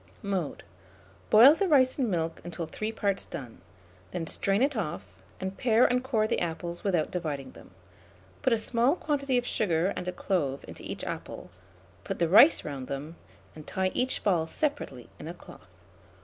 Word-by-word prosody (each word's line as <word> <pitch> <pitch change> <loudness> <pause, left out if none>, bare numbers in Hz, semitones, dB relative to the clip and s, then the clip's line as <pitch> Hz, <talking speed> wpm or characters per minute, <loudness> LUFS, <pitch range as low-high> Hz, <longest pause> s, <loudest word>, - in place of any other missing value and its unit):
Mode. 190 -6 -3 0.7
Boil 240 +7 +9
the 390 +4 0
rice 265 -4 +4
in 250 -4 +1
milk 165 -3 -2
until 170 0 -5
three 215 +7 -4
parts 200 -3 -1
done; 120 -8 -8 0.5
then 165 - -4
strain 195 +7 +1
it 280 0 +1
off, 175 -9 -3 0.3
and 190 +1 -4
pare 235 -1 +4
and 250 0 +2
core 225 -5 +1
the - - 0
apples 170 +1 -4
without 180 -6 0
dividing 145 -7 -4
them. - - -15 0.7
Put - - +2
a 230 - +4
small 240 +6 +2
quantity 280 -6 0
of 245 - 0
sugar 180 -4 +1
and 180 - -5
a - - 0
clove 145 -9 -2
into - - -10
each - - -6
apple, - - -6 0.5
put - - -4
the 170 - +2
rice 215 - +7
round 135 -3 -5
them, 145 +4 -5 0.4
and 155 -1 -11
tie 190 0 -1
each 255 +1 0
ball 170 -5 +2
separately 220 - -3
in - - -8
a 170 - -6
cloth. 175 - -15
190 Hz, 175 wpm, -28 LUFS, 160-245 Hz, 0.7 s, Boil